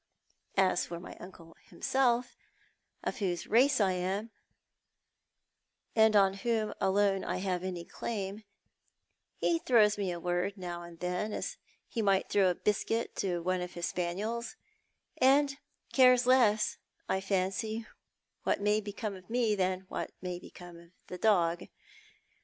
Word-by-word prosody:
As 185 -2 +3
for 170 0 -6
my 180 - -10
uncle 170 -3 -12
himself, 245 -2 +1 0.7
of - - -3
whose 180 -4 -1
race 260 +4 +4
I 195 -3 +3
am, 190 +5 -2 1.6
and 220 -1 +5
on 195 -1 +5
whom 225 -2 0
alone 195 0 +2
I - - -2
have 185 -1 -2
any 180 -2 -4
claim, 205 -1 -5 1.0
he 335 - +2
throws 215 -7 +4
me 195 -3 -1
a 175 - -4
word 180 +3 -1
now 175 -2 -5
and 170 -1 -11
then 180 +4 -2
as - - -4 0.3
he 230 - -2
might 195 -2 +2
throw 195 -2 +4
a 180 - 0
biscuit 220 +4 -1
to 175 -3 -1
one 185 +1 0
of 180 0 -5
his 175 0 -2
spaniels, 205 +7 -3 0.6
and 275 +1 +4 0.4
cares 250 -2 +6
less, 235 -5 +4 0.3
I 190 - 0
fancy, 195 +4 -1 0.6
what - - 0
may 210 +1 +2
become 210 0 -5
of 185 -1 -14
me 235 -2 +2
than 185 -2 0
what 190 - -5
may 180 -1 -4
become 175 -1 -12
of 170 0 -17 0.2
the 180 - -6
dog. 175 -6 +2
195 Hz, 145 wpm, -31 LUFS, 180-220 Hz, 1.6 s, cares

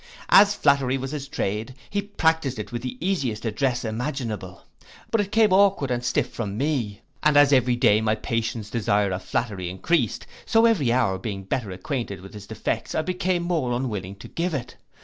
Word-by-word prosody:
As 200 +1 +7
flattery 135 -2 +2
was 135 0 -5
his 145 -2 -5
trade, 110 -2 -3 0.2
he 200 - 0
practised 160 - 0
it 105 - -6
with 120 -1 -4
the 125 0 -5
easiest 130 - -1
address 120 +3 0
imaginable; 110 -5 -4 0.5
but 225 - +3
it 200 0 -5
came 220 -2 +4
aukward 190 -8 +4
and 120 0 -1
stiff 125 - 0
from 105 -3 -4
me; 125 -7 -1 0.2
and 150 -1 +4
as 145 0 +6
every 125 -2 +4
day 115 -4 +4
my 110 0 +1
patron's 115 -2 -3
desire 105 -3 +1
of 90 0 -3
flattery 100 -7 -2
encreased, 120 - 0 0.2
so 225 0 +4
every 175 - +3
hour 115 -7 +1
being 100 -1 -5
better 105 +3 -2
acquainted 100 +1 -4
with 95 +2 -12
his 105 -1 -10
defects, - - -3
I 160 - +1
became 180 0 -1
more 165 -8 0
unwilling 105 -7 -3
to 100 - -11
give 170 -1 -2
it. 125 -2 -5
125 Hz, 190 wpm, -24 LUFS, 105-150 Hz, 0.5 s, As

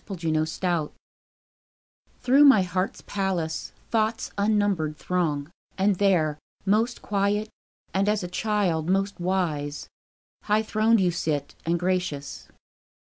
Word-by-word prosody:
Day 170 -4 -3
and 155 +1 -1
Night 170 -4 +1 1.3
Through 265 +3 +5
my 265 -9 +7
heart's 185 +1 -2
palace 185 -5 -2 0.2
Thoughts 225 0 0
unnumbered 200 -7 +1
throng; 155 -5 -1 0.3
And 195 0 +2
there, 165 -7 +2 0.3
most 220 +5 +1
quiet 205 +1 0 0.4
and, 195 +2 +2
as 210 -2 0
a - - -3
child, 180 -4 0
most 195 +1 0
wise, 165 -6 -2 0.6
High 215 +1 +2
throned 220 +1 +3
you 180 -2 +3
sit, 150 -4 -2
and 170 +1 +1
gracious. 175 -6 -2
185 Hz, 120 wpm, -25 LUFS, 165-210 Hz, 1.3 s, my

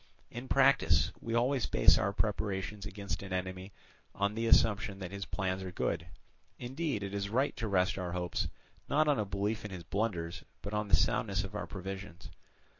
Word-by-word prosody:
In 120 +2 -6
practice 135 0 +4
we 115 0 -2
always 125 +1 +2
base - - +6
our 105 -2 +1
preparations 105 -1 -2
against 100 0 -5
an 95 -1 -8
enemy 95 +1 -3 0.4
on 100 +1 +1
the 115 +1 -1
assumption 110 -2 +4
that 95 -2 -6
his 100 0 -5
plans 95 -1 -1
are 95 -1 -5
good; - - -1 0.5
indeed, 130 -3 -2
it 100 0 -4
is 100 0 -2
right 130 +6 +1
to 115 - -2
rest 95 -1 +2
our 90 -2 -3
hopes 90 -1 -1 0.4
not 155 +2 +3
on 145 -4 +3
a 105 - +1
belief 100 +3 -1
in 105 - -5
his 90 -3 -7
blunders, 90 -6 -2 0.2
but 100 - -5
on 105 0 0
the - - +6
soundness 100 -6 +1
of 95 +1 -7
our 105 - -4
provisions. 95 -5 -7
100 Hz, 190 wpm, -32 LUFS, 95-115 Hz, 0.5 s, base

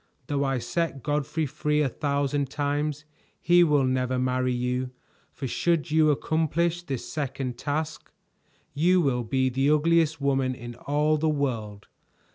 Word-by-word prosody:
Though 140 +1 -1
I 135 -1 0
set 135 +3 -2
Godfrey 150 +2 -1
free 150 +2 0
a - - +2
thousand 140 0 -1
times, 145 +1 -2 0.3
he 175 +1 +5
will 150 -4 +3
never 130 0 0
marry 130 0 0
you, 125 +1 -1 0.4
for 140 - -6
should 165 +3 0
you 155 0 +4
accomplish 160 +3 0
this 135 -8 -5
second 135 -4 -4
task, 155 +2 -3 0.6
you 175 +6 +3
will 130 -7 +1
be 130 +3 +1
the 135 +3 +1
ugliest 160 +1 +3
woman 135 -2 +1
in 120 -1 -8
all 150 +5 0
the 160 +1 +1
world. 115 -9 -2
145 Hz, 145 wpm, -26 LUFS, 130-155 Hz, 0.6 s, he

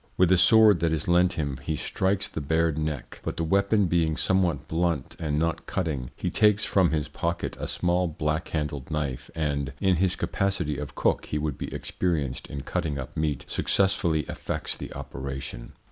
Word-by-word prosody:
With 90 -1 +4
a 95 - +6
sword 110 -1 +7
that 80 0 +1
is 80 0 -1
lent 90 +1 +4
him 70 -6 -3
he 75 +3 -2
strikes 95 +5 0
the 80 - -5
bared 80 +2 +1
neck, 75 -4 -4
but - - -4
the 85 - 0
weapon 100 +4 +3
being 80 -2 +1
somewhat 90 -6 +1
blunt 80 -4 -1
and 75 -2 -1
not 85 +1 -1
cutting, 75 -9 -2
he - - -3
takes 105 -1 +4
from 95 -4 +3
his 75 -2 -1
pocket 85 +3 -3
a - - -3
small 90 0 +1
black 75 +1 -2
handled 75 -3 -3
knife 75 -5 -3
and 70 -4 -1
(in 95 -3 +3
his 95 +1 +2
capacity 95 -7 -1
of 75 -2 -6
cook - - +1
he 75 - -2
would 75 -3 -2
be - - -4
experienced 75 -8 -2
in 70 - -5
cutting 80 -1 -2
up 65 - -6
meat) 75 -4 -1
successfully 95 -5 +2
effects - - -4
the - - -8
operation." 65 -3 -6
80 Hz, 185 wpm, -26 LUFS, 75-90 Hz, -, sword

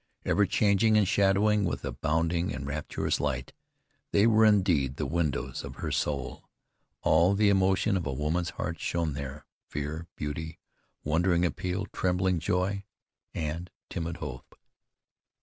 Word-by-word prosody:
Ever 100 -1 +3
changing 110 +1 +3
and 105 -3 +4
shadowing 100 +1 +3
with 90 - -2
a - - -2
bounding, 85 +3 0 0.2
rapturous 70 +2 -2
light, 65 -3 -2 0.6
they 100 - +4
were 110 -1 +5
indeed 90 -11 +3
the 75 - -2
windows 80 0 -1
of - - -8
her - - -4
soul. 70 -4 -2 0.5
All 85 +5 +4
the 105 0 +4
emotion 95 +1 +3
of 85 -5 -1
a - - -1
woman's 80 +5 -1
heart 85 -1 -4
shone 85 -3 -1
there, 70 +1 -6 0.2
fear, 75 +3 -4
beauty, 80 +2 -5 0.5
wondering 85 +3 +2
appeal, 90 +3 -2
trembling 90 -1 +1
joy, 95 +4 0 0.5
and 80 +3 -3 0.2
timid 85 0 -3
hope. 65 -2 -8
85 Hz, 135 wpm, -29 LUFS, 75-95 Hz, 0.6 s, were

